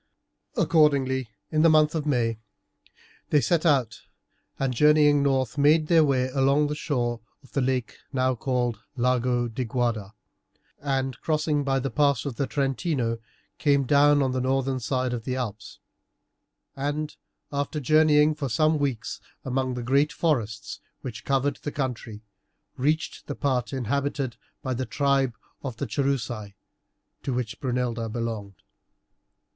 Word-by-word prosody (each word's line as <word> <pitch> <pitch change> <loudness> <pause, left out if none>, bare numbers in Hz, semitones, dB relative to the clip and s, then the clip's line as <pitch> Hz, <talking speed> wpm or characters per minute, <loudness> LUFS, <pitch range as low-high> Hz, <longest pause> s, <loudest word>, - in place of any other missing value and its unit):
Accordingly 135 -6 +3 0.2
in 155 - +2
the 165 - +6
month 155 -1 +4
of 155 -2 -2
May 115 -5 +1 0.9
they 150 - +4
set 160 +7 +2
out, 130 -7 +2 0.6
and 135 -2 0
journeying 150 +2 +5
north 135 -2 +1
made 155 +2 +4
their 165 -2 +6
way 130 -3 +1
along 140 +2 +3
the 150 - -1
shore 120 -6 -1 0.2
of 135 - -19
the 140 - 0
lake 130 -1 -1
now 130 -1 +1
called 120 -2 -1 0.2
the 125 - -5
Lago 125 -1 +2
di 120 +3 -3
Guarda, 115 -4 -2 0.6
and, 135 -3 -2
crossing 155 -2 +1
by 135 -1 +1
the 135 0 -2
pass 140 -2 +2
of 135 -5 -4
the 140 - 0
Trentino, 135 -4 -1 0.4
came 140 -2 +3
down 145 +1 +5
on 130 - 0
the 130 0 -1
northern 130 0 0
side 130 0 -1
of 120 -2 -4
the 130 +1 -2
Alps, 110 -5 -5 1.0
and, 145 +2 -3 0.4
after 145 +1 -2
journeying 155 +1 +4
for 145 -3 -4
some 155 +7 +2
weeks 115 -8 -2 0.2
among 130 -1 -1
the 125 - -4
great 140 +5 +2
forests 115 -10 -1 0.2
which 115 -4 -7
covered 140 +1 +1
the 145 - -5
country, 120 -6 -4 0.5
reached 155 +5 -1
the 145 - -4
part 130 -4 0
inhabited 135 0 -1 0.3
by 130 - -1
the 125 0 -3
tribe 135 0 +1 0.3
of 130 -5 -5
the - - -2
Cherusei, 120 -7 -2 0.7
to 130 - -2
which 120 -1 -3
Brunilda 120 -3 -1
belonged. 110 -4 -5
135 Hz, 145 wpm, -26 LUFS, 120-145 Hz, 1.0 s, the